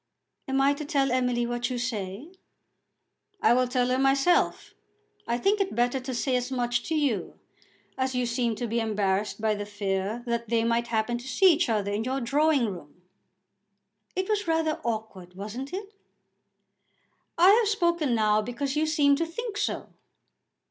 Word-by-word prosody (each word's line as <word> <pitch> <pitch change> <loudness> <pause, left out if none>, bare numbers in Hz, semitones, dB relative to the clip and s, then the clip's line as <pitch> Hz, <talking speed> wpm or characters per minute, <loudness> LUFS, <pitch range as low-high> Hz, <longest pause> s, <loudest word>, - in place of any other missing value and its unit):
"Am 270 0 0
I 275 +1 +4
to 285 - -6
tell 280 -3 +1
Emily 250 -1 +1
what 240 +1 -2
you 250 - -3
say?" 230 - -4 1.1
"I - - +4
will 255 +1 +2
tell 250 0 0
her 255 +1 +1
myself. 270 +6 +2 0.5
I 235 - 0
think 400 +9 +2
it 385 - -2
better 245 +2 +1
to 255 0 -5
say 255 +2 0
as 250 +1 -1
much 240 -1 0
to 320 - -1
you, 265 - -1 0.6
as 260 0 0
you 250 0 +1
seemed 235 -2 -1
to 240 - -3
be 230 +1 -1
embarrassed 210 -2 -1
by 215 0 +1
the 205 0 -4
fear 205 +2 -2
that 235 -2 -2
they 230 -1 +2
might 235 +1 +1
happen 235 +1 -1
to 245 - -10
see 360 +8 +5
each 315 -3 0
other 205 -3 0
in 210 +2 -1
your 260 +3 -1
drawing 280 +2 +2
room." 175 -4 -8 1.1
"It 375 0 -1
was 420 -2 -1
rather 320 -1 0
awkward; 215 -6 -5
wasn't 215 +8 -6
it?" 400 +2 -6 1.4
"I 350 +3 +7
have 445 +1 +4
spoken 340 - +1
now 215 -1 +3
because 265 +5 -3
you 310 +1 +1
seemed 285 -2 +3
to 330 - 0
think 440 +6 -5
so." - - -2
245 Hz, 175 wpm, -27 LUFS, 225-290 Hz, 1.4 s, I